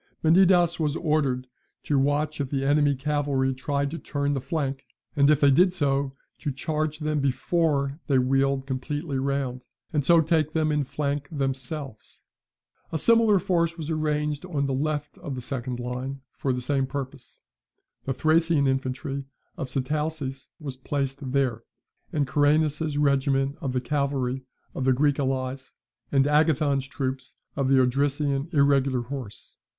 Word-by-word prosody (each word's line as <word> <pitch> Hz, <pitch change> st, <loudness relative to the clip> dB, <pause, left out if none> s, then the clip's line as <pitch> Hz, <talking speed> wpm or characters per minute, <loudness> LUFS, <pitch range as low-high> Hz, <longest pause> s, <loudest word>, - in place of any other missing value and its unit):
Menidas 175 Hz, 0 st, +5 dB
was 150 Hz, -2 st, 0 dB
ordered 145 Hz, -6 st, 0 dB, 0.4 s
to 145 Hz, -2 st, +1 dB
watch 145 Hz, +2 st, 0 dB
if 135 Hz, -, -3 dB
the 135 Hz, -1 st, -1 dB
enemy's 145 Hz, -1 st, +3 dB
cavalry 140 Hz, -2 st, 0 dB
tried 140 Hz, +2 st, -2 dB
to 165 Hz, -, -5 dB
turn 145 Hz, -1 st, -1 dB
the 135 Hz, -, -2 dB
flank, 140 Hz, -4 st, -2 dB, 0.3 s
and 140 Hz, -1 st, +4 dB
if 150 Hz, -1 st, +4 dB
they 140 Hz, -1 st, +6 dB
did 180 Hz, +6 st, +4 dB
so, 140 Hz, -4 st, +1 dB, 0.3 s
to 145 Hz, -, -2 dB
charge 155 Hz, +3 st, -2 dB
them 150 Hz, -1 st, -1 dB
before 140 Hz, +1 st, 0 dB
they 140 Hz, -, +3 dB
wheeled 135 Hz, +1 st, +2 dB
completely 140 Hz, +2 st, -3 dB
round, 135 Hz, -2 st, -2 dB, 0.3 s
and 150 Hz, -2 st, +1 dB
so 170 Hz, +5 st, +6 dB
take 160 Hz, -1 st, +1 dB
them 155 Hz, -2 st, +1 dB
in 150 Hz, -1 st, +1 dB
flank 140 Hz, +1 st, -2 dB
themselves. 135 Hz, -3 st, -4 dB, 0.7 s
A 160 Hz, -, 0 dB
similar 225 Hz, +3 st, +4 dB
force 170 Hz, -2 st, 0 dB
was 160 Hz, -1 st, -4 dB
arranged 150 Hz, -1 st, -1 dB
on 155 Hz, -6 st, -1 dB
the 135 Hz, -, -1 dB
left 150 Hz, +2 st, -2 dB
of 140 Hz, -, -5 dB
the -, -, -5 dB
second 125 Hz, -1 st, -4 dB
line 125 Hz, +2 st, -4 dB
for 135 Hz, -, -1 dB
the 125 Hz, 0 st, -2 dB
same 135 Hz, +1 st, 0 dB
purpose, 135 Hz, -1 st, -7 dB, 0.7 s
The 135 Hz, -, -1 dB
Thracian 160 Hz, +1 st, +3 dB
infantry 135 Hz, +1 st, -2 dB, 0.3 s
of 135 Hz, -, -5 dB
Sitalces 145 Hz, 0 st, -3 dB
was 140 Hz, -5 st, -6 dB
placed 135 Hz, 0 st, -3 dB
there, 130 Hz, -4 st, +1 dB, 0.5 s
and 145 Hz, -2 st, +1 dB
Coeranus's 150 Hz, +2 st, +2 dB
regiment 140 Hz, -1 st, +2 dB
of 135 Hz, -, -2 dB
the 125 Hz, 0 st, -1 dB
cavalry 135 Hz, -1 st, -1 dB, 0.3 s
of 135 Hz, -, -3 dB
the 130 Hz, -, +5 dB
Greek 145 Hz, +2 st, +2 dB
allies, 130 Hz, -1 st, -2 dB, 0.4 s
and 135 Hz, -1 st, +4 dB
Agathon's 150 Hz, -2 st, +2 dB
troops 130 Hz, -3 st, -4 dB, 0.2 s
of 140 Hz, -2 st, 0 dB
the 135 Hz, 0 st, +5 dB
Odrysian 140 Hz, +3 st, +1 dB
irregular 140 Hz, -4 st, +3 dB
horse. 125 Hz, -3 st, -8 dB
140 Hz, 155 wpm, -26 LUFS, 135-150 Hz, 0.7 s, they